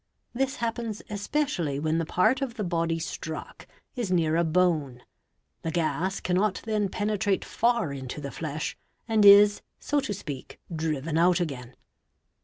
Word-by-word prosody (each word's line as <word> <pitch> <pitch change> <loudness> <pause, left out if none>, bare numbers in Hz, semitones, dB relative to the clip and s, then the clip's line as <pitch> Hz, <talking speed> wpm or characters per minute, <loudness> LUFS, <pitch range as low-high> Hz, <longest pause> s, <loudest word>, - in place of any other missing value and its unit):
This 270 +3 0
happens 230 -3 -3
especially 205 - -1
when 155 +2 0
the 165 - -2
part 220 - +2
of 255 -4 -3
the 215 - -3
body 165 -2 0
struck 160 -1 -6 0.3
is 235 -7 -2
near 165 -3 +2
a 170 - +3
bone; 155 -7 +1 0.6
the 165 - -3
gas 175 +3 -1
cannot 185 +3 +1
then 210 -3 0
penetrate 205 -1 0
far 235 -10 +1
into 130 +1 -6
the 140 -2 -6
flesh 155 -1 -4 0.3
and 220 -2 +3
is, 205 +1 +8 0.2
so 295 - 0
to 265 -7 -2
speak, 145 -8 -8 0.2
driven 155 0 -1
out 175 +1 +4
again. 130 -7 -4
180 Hz, 150 wpm, -27 LUFS, 155-215 Hz, 0.6 s, is